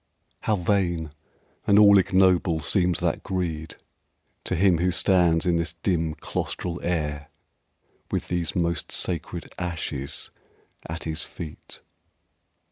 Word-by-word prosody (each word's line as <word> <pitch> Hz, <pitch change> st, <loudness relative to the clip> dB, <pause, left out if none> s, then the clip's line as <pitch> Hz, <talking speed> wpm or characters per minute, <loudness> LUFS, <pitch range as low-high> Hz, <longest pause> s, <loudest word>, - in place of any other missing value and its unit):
How 110 Hz, -, +1 dB
vain 85 Hz, -4 st, 0 dB, 0.6 s
and 100 Hz, -, +5 dB
all 100 Hz, -1 st, +8 dB
ignoble 95 Hz, -3 st, +3 dB
seems 90 Hz, +2 st, +1 dB
that -, -, 0 dB
greed 80 Hz, -4 st, -3 dB, 0.7 s
To -, -, 0 dB
him 90 Hz, -1 st, +4 dB
who 90 Hz, +1 st, +2 dB
stands 90 Hz, -2 st, +3 dB
in 85 Hz, -1 st, +2 dB
this 85 Hz, 0 st, -1 dB
dim 85 Hz, -2 st, -1 dB
claustral 85 Hz, -1 st, -4 dB
air 75 Hz, -4 st, -2 dB, 0.8 s
With -, -, -2 dB
these 85 Hz, -3 st, -1 dB
most 85 Hz, -1 st, -1 dB
sacred 85 Hz, -1 st, -2 dB
ashes 80 Hz, -5 st, -3 dB, 0.6 s
at 80 Hz, +1 st, -5 dB
his 80 Hz, 0 st, -3 dB
feet! 80 Hz, -3 st, -8 dB
85 Hz, 120 wpm, -25 LUFS, 80-90 Hz, 0.8 s, all